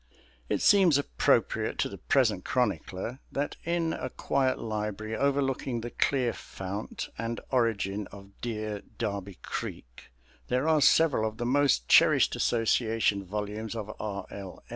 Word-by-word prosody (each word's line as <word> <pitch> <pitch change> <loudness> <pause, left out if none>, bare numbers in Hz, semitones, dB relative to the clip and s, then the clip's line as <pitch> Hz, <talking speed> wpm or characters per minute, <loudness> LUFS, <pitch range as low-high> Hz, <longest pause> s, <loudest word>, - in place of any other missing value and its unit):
It - - 0
seems 190 -8 +6
appropriate 145 - +1
to - - +1
the - - -9
present - - +2
chronicler 115 +8 -1
that 145 +1 -2
in 170 -1 0
a 130 - -4
quiet 130 +1 0
library 110 0 -3
overlooking 135 -2 0
the 120 +1 -6
clear 125 -4 +1
fount 95 +3 -6
and 115 +1 -3
origin 105 -5 0
of 100 0 -13
dear 110 -3 -3 0.2
Darby 100 -4 -3
Creek - - -7 0.4
there 125 +4 0
are 155 -2 +4
several 140 -7 +4
of 110 - -15
the 120 - -3
most 135 - +2
cherished - - +5
association 115 -3 +1
volumes 105 +3 -4
of 110 -1 -5
R. 100 -3 -4
L. 95 -2 -9
115 Hz, 140 wpm, -29 LUFS, 105-135 Hz, 0.4 s, seems